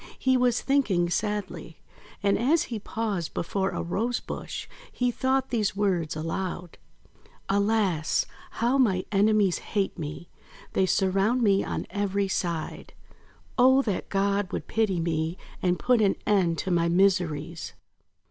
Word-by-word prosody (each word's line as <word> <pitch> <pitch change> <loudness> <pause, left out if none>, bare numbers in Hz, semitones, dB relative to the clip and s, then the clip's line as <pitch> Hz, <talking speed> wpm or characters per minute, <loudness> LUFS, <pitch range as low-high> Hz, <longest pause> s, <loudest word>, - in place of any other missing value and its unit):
He 260 0 +2
was 250 -1 +2
thinking 200 -12 +2
sadly; 210 +1 -3 0.5
and, 200 0 +3
as 290 +8 +2
he 220 - -2
paused 205 -5 -3
before 190 +3 -1
a - - -3
Rose 230 +8 -1
bush, - - -6 0.2
he 250 -1 0
thought 265 +1 0
these 215 -5 0
words 180 -7 0
aloud: 175 +2 -4 0.3
— - - -31 0.3
"Alas! 200 -6 +1 0.3
How 245 +4 +1
my 190 -8 +2
enemies 205 -2 +3
hate 195 -3 -2
me! 155 +2 -6 0.5
They 190 - +2
surround 195 +7 +2
me 200 -2 +3
on - - -3
every 200 -1 0
side! 170 -4 -3 0.7
Oh, 260 +2 +6
that 205 -7 -3
God 200 0 0
would - - -4
pity 215 -5 0
me, 165 +1 -1 0.2
and 180 -1 +2
put 245 +2 +2
an 200 -2 +3
end 180 -5 +2
to 190 - -2
my 170 -1 +2
miseries!' 170 -3 +1
195 Hz, 140 wpm, -27 LUFS, 175-225 Hz, 0.7 s, Oh